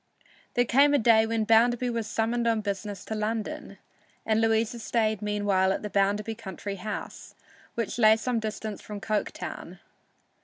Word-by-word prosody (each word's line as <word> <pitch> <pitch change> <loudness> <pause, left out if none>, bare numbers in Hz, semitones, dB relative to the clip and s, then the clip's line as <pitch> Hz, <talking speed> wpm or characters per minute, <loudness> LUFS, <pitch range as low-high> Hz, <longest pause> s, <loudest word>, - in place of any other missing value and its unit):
There 245 - +3
came 285 +4 +4
a - - +5
day 225 -2 +4
when 225 -1 0
Bounderby 240 +3 +3
was 230 -2 -3
summoned 235 +2 0
on 225 -1 +2
business 200 -1 -4
to - - -4
London, 220 +8 -3 0.5
and 220 0 +2
Louisa 225 +1 +1
stayed 220 -2 0
meanwhile 205 -2 +1
at 195 - -2
the 210 - -5
Bounderby 205 +3 +1
country 200 -2 -7
house, 205 +3 -7 0.4
which 230 0 -3
lay 220 -1 +6
some 240 +1 -1
distance 215 -1 -5
from 210 -1 -7
Coketown. 215 0 -4
220 Hz, 155 wpm, -27 LUFS, 210-230 Hz, 0.5 s, lay